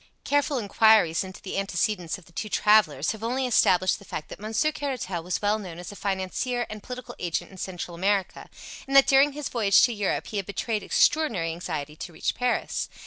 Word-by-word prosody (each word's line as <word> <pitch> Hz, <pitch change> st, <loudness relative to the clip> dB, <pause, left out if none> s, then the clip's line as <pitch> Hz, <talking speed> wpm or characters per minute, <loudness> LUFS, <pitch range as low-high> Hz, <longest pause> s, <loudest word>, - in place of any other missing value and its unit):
Careful 285 Hz, 0 st, +1 dB
inquiries 210 Hz, -5 st, +4 dB
into 190 Hz, 0 st, -10 dB
the 195 Hz, -, -3 dB
antecedents 180 Hz, -2 st, -1 dB
of 185 Hz, -, -17 dB
the -, -, -20 dB
two 215 Hz, +5 st, -5 dB
travellers 195 Hz, -11 st, +3 dB
have 220 Hz, 0 st, -8 dB
only 255 Hz, +3 st, -1 dB
established 185 Hz, -6 st, +3 dB
the -, -, -14 dB
fact 155 Hz, -, -7 dB
that -, -, -9 dB
Monsieur 220 Hz, +8 st, 0 dB
Caratal 260 Hz, -, -4 dB
was 180 Hz, +4 st, -3 dB
well 210 Hz, +1 st, +2 dB
known 180 Hz, -5 st, -8 dB
as 175 Hz, +2 st, -8 dB
a -, -, -10 dB
financier 200 Hz, +6 st, -2 dB
and 215 Hz, -1 st, -7 dB
political 250 Hz, +2 st, -8 dB
agent 175 Hz, +1 st, -3 dB
in 190 Hz, -, -13 dB
Central 180 Hz, -1 st, -5 dB
America, 195 Hz, +2 st, -1 dB, 0.4 s
and 275 Hz, -, -2 dB
that 275 Hz, -, +8 dB
during 275 Hz, +1 st, +4 dB
his 295 Hz, -1 st, -4 dB
voyage 205 Hz, -5 st, +4 dB
to 240 Hz, -, +3 dB
Europe 205 Hz, -3 st, -1 dB
he 210 Hz, -, -5 dB
had 195 Hz, -, -3 dB
betrayed 210 Hz, +1 st, -2 dB
extraordinary 220 Hz, -, +2 dB
anxiety 155 Hz, -3 st, -5 dB
to 170 Hz, +2 st, -8 dB
reach 160 Hz, -, -1 dB
Paris. 250 Hz, 0 st, -1 dB
205 Hz, 200 wpm, -26 LUFS, 180-240 Hz, 0.4 s, that